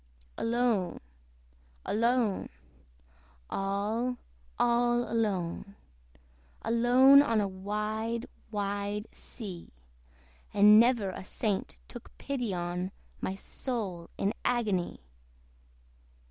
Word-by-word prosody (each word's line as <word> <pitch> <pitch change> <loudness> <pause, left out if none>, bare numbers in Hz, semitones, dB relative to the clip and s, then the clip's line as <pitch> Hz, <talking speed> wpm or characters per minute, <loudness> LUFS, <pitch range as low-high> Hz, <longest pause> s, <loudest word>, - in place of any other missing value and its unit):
Alone, 230 -5 0 0.9
alone, 230 -1 +1 1.0
all, 210 +6 -1 0.4
all 240 0 +2
alone, 200 -3 -1 0.9
Alone 245 +4 +6
on 230 -6 +2
a 205 - +1
wide 210 +4 -3 0.2
wide 205 0 -2
sea! 190 -7 -9 0.9
And 210 +1 +8
never 230 -5 +3
a 185 - -7
saint 200 +1 -2
took 240 - -11
pity 250 -6 -3
on 180 +1 -3 0.3
My 190 - -2
soul 195 -6 -4
in 200 - 0
agony. 210 - 0
215 Hz, 80 wpm, -30 LUFS, 195-240 Hz, 1.0 s, And